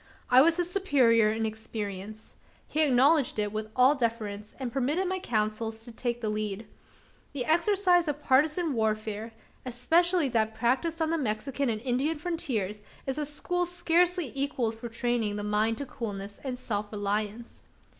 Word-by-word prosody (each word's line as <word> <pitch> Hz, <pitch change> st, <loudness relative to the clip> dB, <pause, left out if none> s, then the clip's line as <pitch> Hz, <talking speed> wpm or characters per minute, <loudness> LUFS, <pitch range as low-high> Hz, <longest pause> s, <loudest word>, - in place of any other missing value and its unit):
I 255 Hz, +1 st, +8 dB
was 330 Hz, +4 st, +4 dB
his 350 Hz, -1 st, +1 dB
superior 260 Hz, -, +3 dB
in 220 Hz, +1 st, -1 dB
experience. 215 Hz, -1 st, -6 dB, 0.3 s
He 310 Hz, -, 0 dB
acknowledged 280 Hz, 0 st, +4 dB
it 210 Hz, -1 st, -1 dB
with 215 Hz, 0 st, -3 dB
all 255 Hz, +3 st, +6 dB
deference, 220 Hz, -5 st, -3 dB
and 255 Hz, -3 st, -5 dB
permitted 290 Hz, +8 st, 0 dB
my 375 Hz, +1 st, -1 dB
counsels 220 Hz, -3 st, -2 dB
to 240 Hz, -, -9 dB
take 240 Hz, +1 st, -3 dB
the 220 Hz, -, -2 dB
lead. 215 Hz, 0 st, -3 dB, 0.7 s
The 260 Hz, -4 st, -2 dB
exercise 355 Hz, 0 st, +3 dB
of 295 Hz, -1 st, -2 dB
partisan 305 Hz, +4 st, +2 dB
warfare 220 Hz, -1 st, -2 dB, 0.3 s
especially 325 Hz, +7 st, +2 dB
that 220 Hz, -2 st, 0 dB
practised 265 Hz, +9 st, 0 dB
on 320 Hz, -, 0 dB
the 330 Hz, -, 0 dB
Mexican 260 Hz, +2 st, -1 dB
and 220 Hz, -2 st, -1 dB
Indian 265 Hz, +6 st, 0 dB
frontiers 265 Hz, -, -3 dB, 0.2 s
is 270 Hz, +2 st, -2 dB
a 295 Hz, -, -1 dB
school 355 Hz, +4 st, -1 dB
scarcely 350 Hz, -1 st, +1 dB
equalled 270 Hz, -5 st, -1 dB
for 225 Hz, +1 st, -8 dB
training 230 Hz, -2 st, -1 dB
the 205 Hz, -, -4 dB
mind 215 Hz, +2 st, +1 dB
to 280 Hz, -, -4 dB
coolness 205 Hz, -5 st, -6 dB
and 260 Hz, -2 st, -3 dB
self 210 Hz, -4 st, -3 dB
reliance. 210 Hz, +2 st, -3 dB
245 Hz, 160 wpm, -28 LUFS, 215-300 Hz, 0.7 s, I